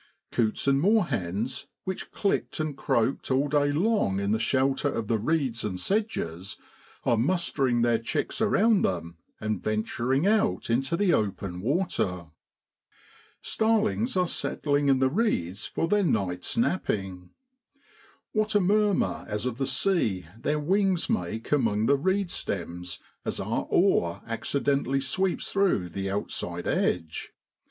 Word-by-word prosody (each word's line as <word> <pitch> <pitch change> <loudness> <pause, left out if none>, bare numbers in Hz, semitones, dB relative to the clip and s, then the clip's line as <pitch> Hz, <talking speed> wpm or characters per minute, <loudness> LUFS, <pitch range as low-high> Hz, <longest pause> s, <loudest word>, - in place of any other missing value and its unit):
Coots 115 +2 0
and 140 0 +4
moorhens, 130 - 0 0.2
which 190 -1 -4
clicked 200 -5 -1
and 155 -2 -2
croaked 125 0 0
all 135 +2 +2
day 145 0 +2
long 165 - +1
in 100 +1 0
the 110 - +2
shelter 135 +4 +1
of 115 -6 -2
the 115 -1 +1
reeds 130 -2 0
and 95 -4 -3
sedges, 100 - -2 0.5
are 120 - +3
mustering 135 -4 +1
their 120 -1 +3
chicks 115 - -2
around 220 -1 +4
them 85 -2 -2 0.2
and 110 -3 -2
venturing 120 - 0
out 200 - +2
into 135 +7 +1
the 195 -3 +3
open 95 -3 -1
water. 95 - -1 1.1
Starlings 220 0 +1
are 180 - +3
settling 145 -4 0
in 135 -1 +5
the 130 0 +3
reeds 130 - -1
for 165 - -1
their 210 +4 +3
night's 100 - -1
napping. 95 - -1 1.0
What 215 0 0
a - - +6
murmur 205 +1 +2
as 105 +2 -3
of 125 -1 -3
the 135 - 0
sea 110 - +1
their 150 +6 -1
wings 190 +3 +1
make 105 +6 -2
among 110 -7 +2
the 140 - +4
reed 190 +5 0
stems 90 -1 -4 0.3
as - - -3
our - - -2
oar 85 0 +2
accidentally 135 +3 0
sweeps 180 +8 -1
through 190 - +2
the 95 +3 -3
outside 100 +1 -3
edge 80 -3 -1
135 Hz, 140 wpm, -27 LUFS, -, 1.1 s, a